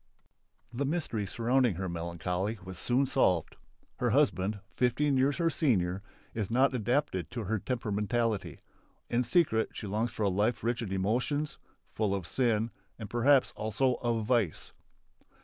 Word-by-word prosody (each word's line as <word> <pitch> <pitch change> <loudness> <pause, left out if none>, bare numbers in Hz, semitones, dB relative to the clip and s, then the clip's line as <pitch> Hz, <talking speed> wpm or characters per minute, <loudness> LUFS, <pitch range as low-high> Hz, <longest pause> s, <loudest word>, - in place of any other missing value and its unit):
The 130 +4 -1
mystery 135 - -2
surrounding 120 0 +2
her 95 +2 -3
melancholy 90 +5 -3
was 95 -1 -7
soon 125 +3 +2
solved. 95 - +1 0.4
Her - - +1
husband, 100 +3 +2 0.2
fifteen 130 +3 +2
years 135 +2 +2
her 165 -1 +2
senior, 100 - +1 0.3
is 110 -4 -2
not 130 +4 +3
adapted 120 - 0
to 120 -3 -4
her 110 +2 -1
temperamentally. 110 -1 -1 0.5
In 120 +1 +2
secret 120 -5 +2
she - - -6
longs 110 +4 -1
for 110 - -3
a - - +3
life 105 +5 +1
rich 120 +1 0
in 105 -5 -4
emotions, 120 +10 -1 0.3
full 105 -3 0
of 95 -3 -4
sin 115 0 +1 0.3
and 110 -3 -8
perhaps 130 +3 +4
also 115 +5 +1
of 115 -3 0
vice. 110 -8 0
115 Hz, 150 wpm, -30 LUFS, 100-125 Hz, 0.5 s, perhaps